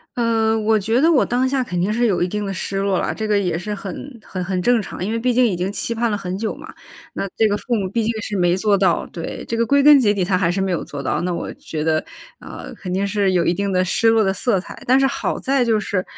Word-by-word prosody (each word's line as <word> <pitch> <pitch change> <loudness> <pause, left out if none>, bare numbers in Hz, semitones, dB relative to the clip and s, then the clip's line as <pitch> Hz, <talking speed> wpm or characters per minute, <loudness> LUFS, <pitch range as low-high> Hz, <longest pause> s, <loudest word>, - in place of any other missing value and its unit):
呃， 225 -2 +1
我 220 0 +2
觉 225 +5 +1
得 325 +4 +4
我 290 - +4
当 250 +2 0
下 265 0 0
肯 180 -7 -3
定 195 +5 0
是 240 +1 +2
有 185 -5 +1
一 180 - 0
定 210 +2 -3
的 195 - -3
失 195 +1 -4
落 195 -1 +1
啦， - - -1
这 220 -1 -4
个 210 -1 +2
也 180 -4 0
是 210 +5 -4
很 220 +6 -8
很 185 -1 -5
很 185 0 -2
正 240 +1 +3
常。 185 - -7
因 210 - -2
为 230 - -1
毕 250 +2 +1
竟 250 +1 +4
已 210 -6 +1
经 180 +3 -2
期 230 +3 -2
盼 230 0 0
了 210 - -1
很 185 -2 -4
久 220 +1 -3
嘛， - - -11 0.4
那 195 - -3
这 220 - +4
个 205 - +1
父 240 +3 -2
母 195 -4 -1
毕 230 +1 0
竟 225 - 0
是 210 - -4
没 175 -1 +2
做 205 +1 +2
到 185 -3 +2
对， 165 -1 -6
这 230 - -2
个 230 0 +1
归 280 +2 +4
根 295 -1 +8
结 215 -5 +3
底， 190 - 0
他 185 0 +1
还 175 -3 +1
是 195 - -2
没 190 -1 0
有 170 - -1
做 140 -1 -7
到。 - - -1
那 180 0 -1
我 170 - -4
觉 155 -1 -5
得 155 0 +1 0.4
呃， - - -9
肯 180 - -7
定 190 +2 0
是 200 -1 +1
有 175 -2 +2
一 170 - +2
定 200 +2 -2
的 185 0 +2
失 225 +5 +2
落 225 -1 +4
的 190 -1 +1
色 195 0 +1
彩。 - - -10
但 260 +2 +5
是 270 - +3
好 270 - -1
在 270 -1 +1
就 225 -3 +2
是， 200 -2 -2
205 Hz, 320 characters per minute, -20 LUFS, 185-230 Hz, 0.4 s, 根